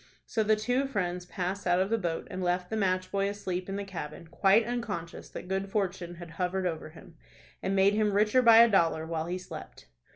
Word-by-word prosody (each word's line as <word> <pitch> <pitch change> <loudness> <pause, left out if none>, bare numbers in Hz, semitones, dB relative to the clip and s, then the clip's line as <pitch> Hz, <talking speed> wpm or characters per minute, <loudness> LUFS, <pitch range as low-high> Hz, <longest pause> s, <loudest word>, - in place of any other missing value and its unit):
So 225 - -1
the 215 0 +3
two 245 +6 0
friends 180 -7 -2
passed 185 +1 -3
out 175 +1 +3
of 190 +3 0
the 230 - +3
boat, 170 -4 -3
and 185 - -4
left 180 0 -1
the - - 0
match 185 -3 0
boy 200 0 +1
asleep 185 -2 -4
in 195 - -3
the 200 - -3
cabin, 170 -4 -7
quite 195 +6 +3
unconscious 215 -8 -4
that - - -8
good 190 +1 -2
fortune 185 -4 -2
had 170 -1 -10
hovered 185 +1 -2
over 160 -3 -3
him, 165 +1 -15 0.4
and 195 - -1
made 195 +1 +4
him 210 0 +2
richer 210 +5 +4
by 230 -2 +8
a - - +6
dollar, 165 -6 +2
while 160 0 -3
he 180 +1 -2
slept. 180 - -10
190 Hz, 220 wpm, -29 LUFS, 175-205 Hz, 0.4 s, by